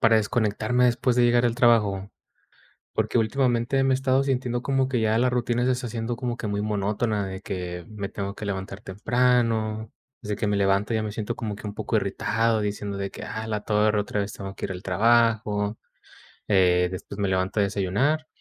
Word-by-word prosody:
para 110 0 +5
desconectarme 115 +2 +1
después 125 0 +2
de 125 - +5
llegar 120 0 +4
del 120 -1 +2
trabajo. 105 -5 +3 0.8
Porque - - 0
últimamente 120 +2 +1
me 135 0 +3
he - - +4
estado 130 0 +2
sintiendo 125 -3 -1
como 135 0 +1
que 130 -2 0
ya 110 0 +2
la 125 +2 +3
rutina 120 0 0
se 130 - +3
está 125 -1 -2
haciendo 115 +1 -3
como 120 0 -3
que - - -5
muy 100 -1 -1
monótona 105 0 -1
de 95 0 -6
que 90 -3 -5
me 100 -2 -5
tengo 100 0 -5
que 105 - -6
levantar 95 0 -4
temprano, 110 0 +1 0.3
de 105 0 -3
que 105 - -2
me 105 0 +1
levanto 100 +2 +2
ya 110 - +1
me 110 - -3
siento 105 0 -4
como 105 -3 -4
que 105 - -11
un 105 - -4
poco - - -3
irritado 115 -1 +1
diciendo 100 -1 -3
de 100 0 -3
que: - - -9
"A 110 0 -5
la 105 -1 -2
torre, 105 0 +2
otra 105 0 -2
vez 100 +1 -2
tengo 95 -1 -7
que - - -5
ir - - -5
al 90 0 -7
trabajo". 110 0 +2 0.7
Eh, 90 -3 +4
después 95 +2 -7
me 100 - +1
levanto 95 +2 0
a - - +4
desayunar, 105 +11 0
110 Hz, 205 wpm, -25 LUFS, 100-120 Hz, 0.8 s, para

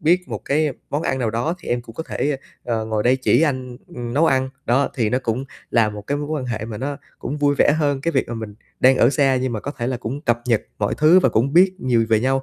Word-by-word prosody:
biết 180 +4 +2
một - - -4
cái 150 0 +1 0.2
món 145 +2 -1
ăn 130 - -1
nào 115 -4 0
đó 120 +9 -1
thì - - -11
em 120 0 0
cũng 115 -1 -13
có 160 - -4
thể, 150 -2 -2 0.3
ơ, 115 -2 -1
ờ, 110 - -3
ngồi 110 -1 -1
đây 125 +3 +3
chỉ 130 +4 +3
anh, 130 -5 -1 0.2
ừm, 120 0 -5
nấu 160 +3 +4
ăn." 130 0 +2 0.2
Đó, 135 +4 +2
thì 110 -4 0
nó 125 - +2
cũng 125 +1 -2 0.3
là 115 -2 +3
một 105 -1 -7
cái 145 - 0
mối 145 - -4
quan 150 -4 -3
hệ 110 -3 -3
mà 110 -2 -6
nó 140 +2 -3 0.2
cũng 140 - -4
vui 145 0 +2
vẻ - - +5
hơn 145 -3 +1
cái 170 +4 -1
việc - - 0
mà 120 - -4
mình 110 -2 -6 0.3
đang 130 +1 +6
ở 120 - +5
xa, 135 -3 +2
nhưng 130 -1 -1
mà 110 - -3
có 145 - -5
thể 120 -5 -4
là 130 0 -1
cũng 125 +4 -5
cập 120 -5 0
nhật 115 -3 +2 0.2
mọi 100 - 0
thứ 155 +4 +6
và 130 - +3
cũng 120 +5 +1
biết 185 +2 +5
nhiều 120 -3 +2
về 110 -1 +3
nhau, 135 +1 +1
130 Hz, 290 wpm, -21 LUFS, 115-145 Hz, 0.3 s, đang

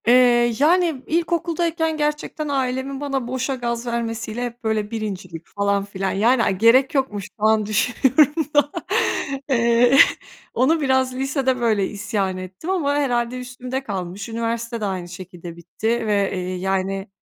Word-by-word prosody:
Eee, 240 -1 +5
yani 325 -2 +3
ilkokuldayken 335 -1 0
gerçekten 300 0 -2
ailemin 265 0 -2
bana 275 -4 -2
boşa 260 +2 -2
gaz 235 -1 -3
vermesiyle 230 0 -3
hep 240 +1 -8
böyle 215 -1 -1
birincilik, 190 -7 -5
falan 200 -1 +1
filan, 195 -1 -3
yani 230 +5 +3
ay 190 - 0
gerek 250 +7 +4
yokmuş 235 -7 0 0.2
şu - - -7
an 220 -1 +3
düşünüyorum 265 +8 +2
da. 290 0 +4 0.8
Eee, 235 +1 +4 0.6
onu 305 +7 +2
biraz 260 -2 +1
lisede 265 -1 0
böyle 215 -5 +1
isyan 205 -2 -2
ettim 185 - -8
ama 325 -7 +1
herhâlde 250 -3 0
üstümde 255 +1 -5
kalmış. 195 -2 -5
Üniversite 230 0 -3
de - - -1
aynı 185 -3 -4
şekilde 180 -2 -9
bitti 175 +6 -6 0.2
ve, 200 -2 +1
eee, 185 0 -3
yani 190 +1 -2
235 Hz, 145 wpm, -22 LUFS, 205-270 Hz, 0.8 s, Eee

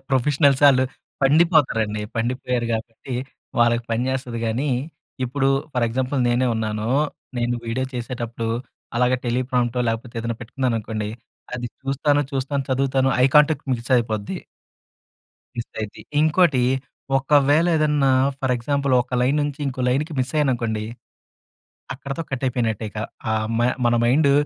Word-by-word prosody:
ప్రొఫెషనల్సాళ్ళు 140 0 +4 0.4
పండిపోతారండి. 135 - +3
పండిపోయారు, 125 +1 -1
కాబట్టి 115 +3 -6 0.4
వాళ్ళకి 120 0 +3
పనిచేస్తది 125 +1 -1
గానీ, 125 +6 -1 0.6
ఇప్పుడు 135 +2 0 0.3
ఫర్ 125 -2 +2
ఎగ్జాంపుల్ 130 +3 -1
నేనే 125 +2 +2
ఉన్నాను. 110 -1 -2 0.5
నేను 120 0 0
వీడియో 125 +3 -1
చేసేటప్పుడు, 120 -2 -4 0.5
అలాగా 125 +1 +3
టెలీ 120 +2 +1
ప్రాంప్టో, 125 -1 +1
లేకపోతే 115 +2 -3
ఏదన్న 115 0 -3
పెట్టుకున్నాననుకోండి, 115 -3 -2 0.5
అది 120 -1 -3 0.2
చూస్తాను, 145 +2 +1
చూస్తాను 135 +1 -1
చదువుతాను 135 0 +2
ఐ - - +7
కాంటాక్ట్ 150 0 +4
మిస్ 120 +2 -3
అయిపోద్ది. 110 -3 -1 1.2
మిస్ 115 - -5
అయిద్ది. 105 -1 -6 0.2
ఇంకోటి, 155 -4 +4 0.6
ఒకవేళ 145 +3 +4
ఏదన్నా 150 -3 +3 0.3
ఫర్ 130 -1 0
ఎగ్జాంపుల్ 140 +2 -1
ఒక 125 +1 -6
లైన్ 135 +4 +2
నుంచి 145 -1 -3
ఇంకో 130 -1 -3
లైన్‌కి 150 +6 0
మిసయ్యాననుకోండి. 125 -6 0 1.1
అక్కడితో 140 +4 -5
కట్టయిపోయినట్టే 120 -4 -1
ఇక, 105 - -8 0.3
ఆహ్, 110 0 0
మ - - +1 0.3
మన 120 - +3
మైండు 140 +4 +4
125 Hz, 120 wpm, -22 LUFS, 115-140 Hz, 1.2 s, ఐ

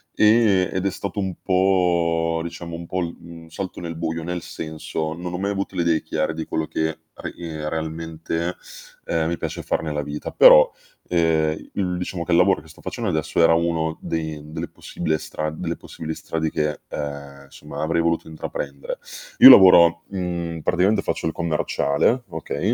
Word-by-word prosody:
e 105 -4 +4
ed 95 +1 -2
è 100 - +2
stato 100 +1 -5
un 95 -2 -2
po' 85 -3 +2
diciamo 85 0 -7
un 85 0 -7
po' 95 - -2
l 85 -1 -4
mhmm, 85 -1 -11
un 80 - -16
salto 95 +2 -5
nel 85 -1 -5
buio. 80 0 -3
Nel 90 +1 -3
senso, 80 0 -5
non 90 +2 -6
ho 90 - -2
mai 100 +2 -1
avuto 100 -1 -3
le 90 - +1
idee 85 -2 +2
chiare 80 0 -1
di 80 0 -5
quello 80 - -2
che 80 - -1 0.3
a - - -7
ehm, 80 -3 -6
realmente, 80 +1 -3 0.5
uhm, 80 -1 0
mi 85 - -2
piace - - -4
far - - -1
nella 75 -2 -2
vita, 75 +1 -5
però, - - +8 0.4
ehm, 80 -2 +1
il 90 -3 -1
diciamo 90 -1 -4
che 85 - 0
lavoro 90 +2 +4
che 80 - -18
sto - - -16
facendo - - -3
adesso, 80 +1 0
era 80 0 +6
uno 80 -1 0
dei 80 -2 -3
delle - - -4
possible 80 -2 -3
stra 75 0 -4
delle 80 - -4
possibili 80 -1 -7
strade, 80 -1 -3
che, 75 0 -1
ehm, 70 -1 -6
insomma - - -8
avrei 85 +2 +1
voluto 85 -1 0
intraprendere. 70 -3 -6 0.4
Io - - +11
lavoro 85 -3 +8
mhmm, 85 -3 -3
praticamente 95 +6 +2
faccio - - -3
il 80 - +1
commerciale, 85 - 0
okay. 80 -3 -2
85 Hz, 180 wpm, -22 LUFS, 80-90 Hz, 0.5 s, Io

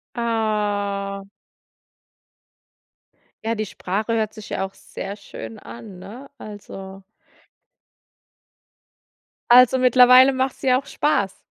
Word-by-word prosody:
Ah. 205 -4 -2 2.2
Ja, 225 +1 0
die 215 -1 -3
Sprache 205 +3 -4
hört 215 -1 -1
sich 215 -1 -11
ja 190 - -2
auch 195 - -16
sehr 195 +1 -8
schön 115 - -10
an, 180 - -11
ne? 225 +9 -11
Also 195 -3 -10 2.5
Also, 250 +1 +7
mittlerweile 255 +1 +6
machts 260 0 -2
dir 255 -1 +3
auch 275 - -9
Spaß, 205 -10 -1
215 Hz, 100 wpm, -22 LUFS, 200-250 Hz, 2.5 s, Also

